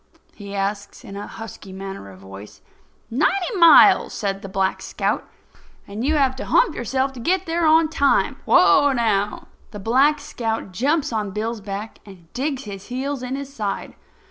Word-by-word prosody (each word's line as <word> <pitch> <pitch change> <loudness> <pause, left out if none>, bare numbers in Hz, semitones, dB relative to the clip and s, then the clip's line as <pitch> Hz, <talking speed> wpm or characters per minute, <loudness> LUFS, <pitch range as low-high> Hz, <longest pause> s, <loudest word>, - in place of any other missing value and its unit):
he 200 -1 -9
asks, 200 +1 -4
in 195 - -10
a 205 - -6
husky 225 -3 -10
manner 195 - -8
of 95 - -13
voice. 95 +2 -12 0.5
"Ninety 355 - 0
miles," 335 -1 +7
says 195 -2 -3
the 195 - -8
Black 190 0 -1
Scout. - - -2 0.6
"And 205 +3 -5
you 305 +4 +1
have 270 -3 +2
to - - -5
hump - - +3
yourself 260 +3 -2
to 255 - -10
get 370 +9 0
there 330 0 0
on 320 +1 +5
time. 285 -3 +1
Whoa, 285 -1 +5
now!" 210 -4 -1 0.2
The 210 - -9
Black 265 +8 +3
Scout 225 -8 -4
jumps 275 - 0
on 210 -2 -2
Bill's 215 +3 -4
back 200 +2 -7
and 180 -5 -16
digs 270 +1 -2
his 200 -2 -9
heels 265 +2 -3
in 255 +1 -4
his 275 0 -7
side. 210 -6 -4
230 Hz, 170 wpm, -22 LUFS, 200-280 Hz, 0.6 s, miles